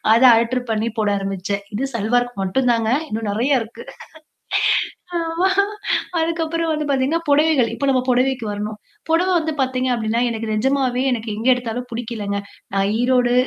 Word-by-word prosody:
அத 245 Hz, -, +3 dB
அல்டெர் 240 Hz, +2 st, +1 dB
பண்ணி 220 Hz, +1 st, 0 dB
போட 210 Hz, -1 st, +2 dB
ஆரம்பிச்சேன். 195 Hz, +1 st, -3 dB
இது 265 Hz, +5 st, -1 dB
சல்வார்க்கு 245 Hz, 0 st, 0 dB
மட்டும் 250 Hz, +7 st, +1 dB
தாங்க. 225 Hz, -1 st, 0 dB, 0.2 s
இன்னும் 220 Hz, -1 st, -3 dB
நெறைய 250 Hz, +4 st, +2 dB
இருக்கு. 225 Hz, +1 st, -9 dB, 1.3 s
ஆமா, 335 Hz, +3 st, 0 dB, 0.7 s
அதுக்கப்புறம் 330 Hz, 0 st, -1 dB
வந்து 305 Hz, -1 st, -1 dB
பாத்தீங்கன்னா, 275 Hz, +4 st, +1 dB
புடவைகள் 285 Hz, -4 st, +4 dB
இப்ப 280 Hz, -, -2 dB
நம்ம 255 Hz, -1 st, +3 dB
புடவைக்கு 250 Hz, -1 st, +1 dB
வரணும். 210 Hz, +1 st, -4 dB, 0.3 s
புடவ 340 Hz, +3 st, +3 dB
வந்து 320 Hz, -1 st, -1 dB
பாத்தீங்க 255 Hz, 0 st, 0 dB
அப்டின்னா, 230 Hz, 0 st, 0 dB
எனக்கு 225 Hz, -1 st, -4 dB
நிஜமாவே 260 Hz, +1 st, +1 dB
எனக்கு 225 Hz, -2 st, -2 dB
எங்கே 250 Hz, +4 st, +3 dB
எடுத்தாலும் 245 Hz, 0 st, -4 dB
புடிக்கலங்க. 225 Hz, -4 st, -3 dB, 0.4 s
நான் 195 Hz, 0 st, +2 dB
ஈரோடு, 245 Hz, -1 st, +3 dB
245 Hz, 145 wpm, -20 LUFS, 220-270 Hz, 1.3 s, புடவைகள்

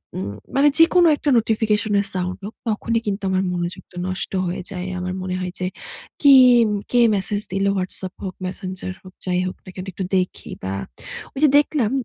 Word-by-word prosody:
উম 95 Hz, -, -3 dB, 0.3 s
মানে 280 Hz, +2 st, +5 dB
যেকোনো 340 Hz, +1 st, +6 dB
একটা 290 Hz, -, -2 dB
নোটিফিকেশনের 215 Hz, -2 st, +1 dB
সাউন্ড 180 Hz, 0 st, -2 dB
হোক, 215 Hz, -, -7 dB, 0.2 s
তখনই 225 Hz, +2 st, 0 dB
কিন্তু 200 Hz, 0 st, -2 dB
আমার 190 Hz, 0 st, +1 dB
মনোযোগটা 175 Hz, +1 st, -5 dB
নষ্ট 185 Hz, 0 st, -3 dB, 0.2 s
হয়ে 175 Hz, +1 st, -3 dB
যায়। 185 Hz, -1 st, -4 dB
আমার 180 Hz, 0 st, -3 dB
মনে 185 Hz, 0 st, -3 dB
হয় 180 Hz, -1 st, -3 dB
যে, 185 Hz, -, -1 dB, 0.5 s
"কি, 285 Hz, -2 st, +8 dB, 0.6 s
কে 245 Hz, -, +4 dB, 0.2 s
মেসেজ 205 Hz, +1 st, -1 dB
দিলো? 195 Hz, +1 st, +1 dB
Whatsapp 185 Hz, 0 st, -4 dB
হোক, 185 Hz, -1 st, -5 dB
Messenger 185 Hz, 0 st, -5 dB
হোক, 185 Hz, -1 st, -14 dB
যাই 180 Hz, -1 st, +1 dB
হোক 185 Hz, -, -6 dB
না, -, -, -11 dB
কি -, -, -10 dB
একটু 190 Hz, -, -4 dB
দেখি" 180 Hz, 0 st, -3 dB
বা, 95 Hz, +1 st, -2 dB, 0.6 s
ঐযে 295 Hz, +3 st, +4 dB
দেখলাম, 285 Hz, -6 st, +2 dB
190 Hz, 175 wpm, -22 LUFS, 185-220 Hz, 0.6 s, কি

